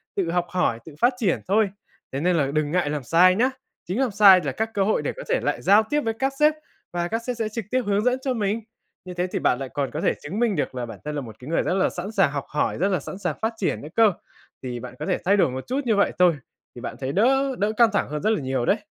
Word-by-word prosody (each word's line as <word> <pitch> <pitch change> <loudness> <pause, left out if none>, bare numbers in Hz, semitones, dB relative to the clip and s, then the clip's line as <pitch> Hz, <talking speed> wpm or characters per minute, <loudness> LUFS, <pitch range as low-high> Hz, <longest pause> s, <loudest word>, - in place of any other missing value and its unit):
tự 175 -4 -1
học 175 0 0
hỏi, 180 -11 0
tự 155 -3 -11
phát 245 +2 +4
triển 205 -8 +1
thôi, 205 +1 +3 0.4
thế 135 - -3
nên 175 +2 +2
là 140 -4 +2
đừng 150 0 0
ngại 175 -4 +1
làm 145 -2 -3
sai 180 +7 +5
nhá, 250 +5 +3 0.4
chính 190 +8 -2
làm 260 -5 +1
sai 195 -2 +7
là 140 - -1
các 220 +11 -2
cơ 195 - +1
hội 215 - +1
để - - -3
có - - -6
thể - - +2
lại - - -1
giao 205 +3 +5
tiếp 295 0 +1
với 225 -4 -1
các 270 +4 -1
sếp 300 +1 +5 0.4
và 175 0 -1
các 225 +5 -2
sếp 250 - -1
sẽ 220 -1 -1
trực 220 -1 -5
tiếp 255 0 +2
hướng 205 0 +1
dẫn 250 +2 +1
cho 260 -2 -1
mình, 215 0 -1 0.4
như 180 - -7
thế 180 +1 -1
thì - - -3
bạn 125 - +1
lại 135 -1 -5
còn 140 -2 -3
có - - -4
thể - - +2
chứng 175 +9 -4
minh 230 -5 +2
được - - -2
là 125 -1 -3
bản 115 -3 -10
thân 150 - -3
là 145 - -2
một 110 -4 -10
cái 130 - -11
người 165 - +1
rất - - 0
là 190 - +2
sẵn 190 +4 -6
sàng 195 -9 +2
học 140 -2 -4
hỏi, 150 - -1
rất 190 +5 +1
là 185 -5 +1
sẵn 185 - -8
sàng 175 -6 -2
phát 220 +1 0
triển 195 - -1
nữa 150 - -8
cơ. 225 -3 +5 0.5
Thì 125 -2 -4
bạn 125 +1 -8
có 150 - -4
thể - - 0
thay 200 +3 +4
đổi 165 -8 +3
một 130 +1 -6
chút 270 +3 -1
như 225 -3 +2
vậy 200 - +3
thôi, 175 -3 +5 0.4
thì 120 - -9
bạn - - -5
thấy 135 0 -3
đỡ 265 - +2
đỡ 205 +2 +1
căng 235 -2 +5
thẳng - - 0
hơn 150 0 -4
rất 215 - +2
là 220 - +1
nhiều 130 -2 -1
đấy. 205 - +3
190 Hz, 305 wpm, -24 LUFS, 150-225 Hz, 0.5 s, sai